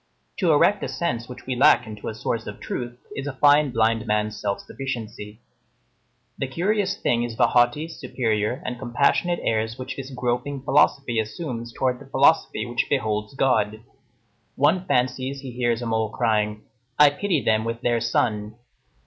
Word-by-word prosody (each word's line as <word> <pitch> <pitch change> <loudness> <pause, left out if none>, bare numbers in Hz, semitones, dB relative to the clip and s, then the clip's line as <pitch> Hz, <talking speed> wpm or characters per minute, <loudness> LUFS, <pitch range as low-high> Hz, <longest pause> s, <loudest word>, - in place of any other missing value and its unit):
To 175 -4 +2
erect 195 +7 +4
a - - -1
sense 125 -9 -3
which 125 - -10
we 130 - -2
lack 130 -1 +5
into 105 -1 -8
a 110 - -4
source 110 0 -3
of 105 - -7
truth, 120 -1 -5 0.2
is 135 +1 -4
a 145 - -3
fine 145 +1 +5
blind 115 -1 +1
man's 105 0 0
self 100 -1 -2
sufficiency. 110 -4 -6 1.0
The 135 - -1
curious 195 +7 0
thing 120 - +1
is 120 -2 -3
the - - +4
haughty, 120 +6 +2
superior, 115 -5 -2
and 125 -1 -4
compassionate 150 +8 +1
airs 110 0 -1
which 130 0 -6
this 135 -1 -6
groping 125 +2 -2
philosophy 135 -4 +2
assumes 115 +1 -4
towards 125 0 -1
the 140 - -13
philosophy 135 -5 +3
which 120 -1 -2
beholds 110 -2 -1
God. 110 -5 +1 0.7
One 175 +6 +2
fancies 130 0 0
he 135 -2 -7
hears 120 -1 -1
a - - -3
mole 110 -1 0
crying, 105 0 0 0.3
"I 150 -1 +7
pity 175 +2 0
them 110 0 +2
with 115 +1 -4
their 120 -2 +1
sun!" 105 -2 0
120 Hz, 165 wpm, -24 LUFS, 110-140 Hz, 1.0 s, I